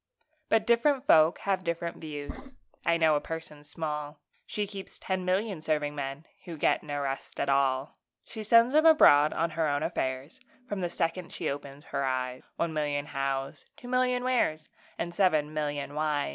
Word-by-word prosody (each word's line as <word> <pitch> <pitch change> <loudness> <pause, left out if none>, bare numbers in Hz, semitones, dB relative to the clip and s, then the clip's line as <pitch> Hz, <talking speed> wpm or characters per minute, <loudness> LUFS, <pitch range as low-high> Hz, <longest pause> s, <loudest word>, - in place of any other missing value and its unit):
But 225 -1 +3
different 255 +4 +3
folk 160 - +5
have 195 -2 0
different 170 -1 -3
views; 160 - -8 0.3
I 170 0 +3
know 160 -2 +4
a 145 - 0
person 160 -2 -7
small 150 -1 -5 0.3
She 210 - -2
keeps 195 -1 -9
ten 190 -1 -2
million 190 -1 0
serving 150 -2 0
men, 140 +1 -5 0.2
Who 170 -3 -7
get - - +2
no 145 -1 -4
rest 135 -1 -4
at 140 - 0
all! 135 0 +1 0.3
She 220 - -7
sends 230 +4 +5
'em 310 +2 +6
abroad 150 - +7
on 165 0 -1
her 160 0 0
own 145 -1 0
affairs, 130 +2 -3 0.3
From 205 -3 -3
the 175 - -1
second 170 +1 -2
she - - -2
opens 140 +1 -8
her 140 -1 -2
eyes 130 -1 -2
One 170 -1 -1
million 145 -2 -1
Hows, 135 0 -3
two 245 - -11
million 250 0 +1
Wheres, 195 -12 0 0.3
And 170 +1 -3
seven 155 -6 +2
million 145 -2 -3
Whys! 150 - 0
155 Hz, 175 wpm, -29 LUFS, 145-190 Hz, 0.3 s, abroad